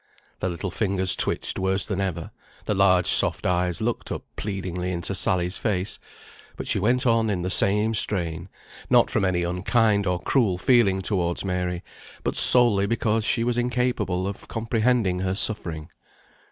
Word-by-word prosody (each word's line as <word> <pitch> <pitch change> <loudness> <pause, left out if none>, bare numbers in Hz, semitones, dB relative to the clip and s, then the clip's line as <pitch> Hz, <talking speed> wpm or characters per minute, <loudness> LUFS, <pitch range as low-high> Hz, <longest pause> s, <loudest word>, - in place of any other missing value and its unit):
The 95 - -2
little 85 +2 -5
fingers 95 -3 +2
twitched - - -1
worse 95 +1 0
than 100 -2 -3
ever; 90 -4 -4 0.3
the - - -1
large 95 -3 +3
soft - - +2
eyes 90 0 -1
looked 115 +1 -3
up - - -5
pleadingly 90 -3 -4
into 85 -2 -3
Sally's 90 +1 +1
face; 100 -3 -2 0.6
but - - -6
she - - 0
went 125 +6 +1
on 115 -2 +2
in 90 -4 -2
the 90 - -2
same 105 +4 +3
strain, 85 -5 -1 0.4
not - - +4
from 110 - 0
any 90 -2 0
unkind 100 +4 +1
or 90 -1 -1
cruel 105 -8 0
feeling 95 -3 +2
towards 90 -2 -2
Mary, 90 -1 -3 0.4
but - - -2
solely 115 -6 +6
because 115 0 0
she 115 +2 0
was 120 0 -1
incapable 120 -7 -1
of 100 0 -7
comprehending 115 -4 0
her 95 0 -2
suffering. 85 -7 -1
95 Hz, 160 wpm, -24 LUFS, 90-110 Hz, 0.6 s, solely